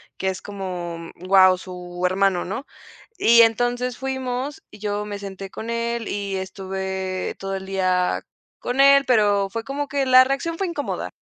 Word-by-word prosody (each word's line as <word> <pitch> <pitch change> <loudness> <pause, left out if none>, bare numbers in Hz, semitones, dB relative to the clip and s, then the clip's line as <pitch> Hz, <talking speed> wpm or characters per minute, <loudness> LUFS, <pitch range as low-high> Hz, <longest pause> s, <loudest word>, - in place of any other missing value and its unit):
Que 190 - -1
es 185 - -4
como, 175 -4 -6
guau, 185 0 +5
su 180 -1 -9
hermano, 190 -1 +2
¿no? 210 +9 -5 0.5
Y 235 0 +7
entonces 245 +2 +1
fuimos 265 +1 -3
y 210 - -13
yo 205 0 -2
me 205 -1 -5
senté 195 -1 -7
con 225 +4 -6
él 235 -1 -2
y 200 -1 -3
estuve 190 0 -4
todo 195 0 -4
el 190 0 -5
día 185 -2 0 0.3
con 250 +2 -2
él, 275 0 +7
pero 205 -5 +3
fue 225 +3 -4
como 280 +4 -3
que 275 -1 -1
la 255 0 +8
reacción 275 +5 -2
fue 390 - 0
incómoda. 320 -5 -3
205 Hz, 165 wpm, -23 LUFS, 190-250 Hz, 0.5 s, la